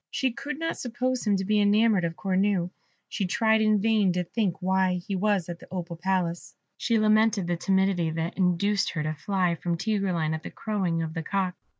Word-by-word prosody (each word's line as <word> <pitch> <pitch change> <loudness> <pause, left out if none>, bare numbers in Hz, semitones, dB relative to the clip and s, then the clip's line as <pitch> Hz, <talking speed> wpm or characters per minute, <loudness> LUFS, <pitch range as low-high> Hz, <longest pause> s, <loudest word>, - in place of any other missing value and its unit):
She 260 -2 0
could 275 +4 -6
not 330 +1 -3
suppose 250 0 -2
him 205 - +4
to 190 0 -2
be 210 +1 +2
enamoured 205 -2 +3
of 165 0 -3
Cornue; 190 -1 0 0.4
she 195 - -2
tried 220 +3 +2
in 215 -1 +3
vain 215 -2 +3
to 180 0 0
think 190 0 -2
why 190 0 +1
he 180 +3 -4
was 200 -2 +1
at 175 0 -6
the - - -14
Opal 175 -2 -5
Palace; 175 -1 -2 0.2
she 230 - 0
lamented 215 -2 +3
the 175 0 0
timidity 190 -2 +1
that 165 +1 -3
induced 195 +2 +1
her 160 -4 -2
to 155 0 -2
fly 180 +2 0
from 170 +1 -2
Tigreline 185 -6 0
at 160 - -4
the - - -7
crowing 185 -6 -2
of 160 -1 -5
the 165 - -3
cock. 185 +2 -1
190 Hz, 205 wpm, -26 LUFS, 175-215 Hz, 0.4 s, him